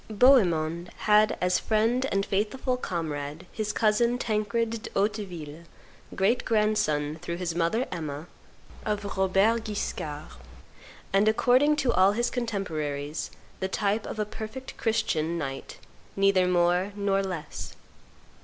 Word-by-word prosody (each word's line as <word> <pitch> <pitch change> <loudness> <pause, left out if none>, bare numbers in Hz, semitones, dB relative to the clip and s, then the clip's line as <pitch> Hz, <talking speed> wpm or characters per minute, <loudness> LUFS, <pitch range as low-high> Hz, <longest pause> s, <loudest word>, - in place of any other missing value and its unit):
Bohemond 175 - +3
had 215 0 +4
as 180 0 +2
friend 230 +4 +1
and 195 0 +1
faithful 220 +6 -1
comrade 160 - -4
his 215 -1 -2
cousin 235 +3 +2
Tancred 220 0 0
de - - -7
Hauteville, 180 -7 -3 0.5
great 200 +6 +2
grandson, 185 -9 +1
through 170 -1 -4
his 175 -2 -2
mother, 170 +9 +1
Emma, 150 -2 -5 0.6
of 210 -1 -2
Robert 195 +4 +2
Guiscard, 155 -8 -4 0.8
and, 200 +2 +4
according 255 +7 +4
to 270 -5 +1
all 190 +2 +5
his 240 +3 0
contemporaries, 155 - -3 0.3
the 190 - -1
type 205 +2 -1
of - - -6
a 210 - 0
perfect 220 +5 -8
Christian 170 -8 0
knight, 135 -4 -5 0.4
neither 195 -2 +3
more 180 +2 +2
nor 200 -1 +1
less. 180 -5 -6
200 Hz, 125 wpm, -27 LUFS, 170-220 Hz, 0.8 s, all